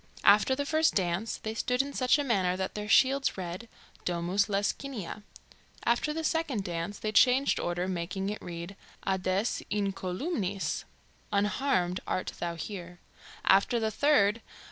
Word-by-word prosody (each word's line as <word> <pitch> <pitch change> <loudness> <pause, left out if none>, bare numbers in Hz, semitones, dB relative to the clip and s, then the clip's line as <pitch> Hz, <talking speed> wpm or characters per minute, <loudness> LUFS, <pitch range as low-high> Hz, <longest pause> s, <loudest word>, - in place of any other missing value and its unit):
After 210 +6 +6
the 285 +1 -2
first 315 +2 +2
dance, 185 +3 0
they 220 - -5
stood 250 +4 +1
in 280 0 -7
such 255 +1 +3
a 290 - 0
manner 190 -8 +1
that 190 0 -3
their 210 0 -5
shields 270 +1 +4
read 185 +5 -6 0.3
"Domus 180 +3 +1
Lescinia"; 205 0 -2 0.6
after 240 +6 +2
the 320 +1 -3
second 310 -10 0
dance, 170 +3 -4
they 215 - -3
changed 255 +5 +4
order, 175 +1 -1
making 185 +2 -2
it 210 - -6
read, 170 +2 -7 0.3
"Ades 190 +3 0
incolumnis" 195 - -2 0.5
(Unharmed 200 -3 +1
art 185 - -2
thou 170 -1 -2
here); 175 0 -7 0.5
after 200 +5 +4
the 220 -1 0
third. 225 -5 +3
200 Hz, 145 wpm, -29 LUFS, 185-250 Hz, 0.6 s, After